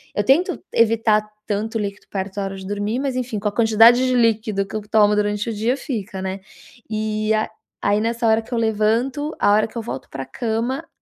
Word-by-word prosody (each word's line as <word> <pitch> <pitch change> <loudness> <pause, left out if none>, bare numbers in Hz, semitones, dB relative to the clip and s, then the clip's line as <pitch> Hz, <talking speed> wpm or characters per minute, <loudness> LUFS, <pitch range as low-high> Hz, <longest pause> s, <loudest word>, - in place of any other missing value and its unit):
Eu 205 - +1
tento 280 - +3
evitar 220 -2 +2 0.2
tanto 215 +2 -2
líquido 205 -1 -5
perto 190 -1 -4
da 200 - -2
hora 195 0 -5
de 190 0 -9
dormir, 205 +4 -2
mas 270 -2 -2
enfim, 245 -3 -3
com 205 +1 -1
a - - -9
quantidade 230 +3 +5
de 255 - +1
líquido 220 -4 +1
que 205 - -5
eu - - -4
tomo 210 -1 +4
durante 210 +1 0
o - - -2
dia 225 +4 0
fica, 220 -8 -5
né. 190 +1 -4 0.5
E 215 0 -1
a 215 0 0 0.3
aí 205 +1 +2
nessa 230 +2 -1
hora 220 0 +4
que 225 +3 -10
eu - - 0
levanto 230 +7 0
a - - +3
hora 215 +1 +3
que 225 - -11
eu - - -1
volto 215 - -7
para 135 - -5
a - - -11
cama, 230 - -3
220 Hz, 225 wpm, -21 LUFS, 205-230 Hz, 0.5 s, quantidade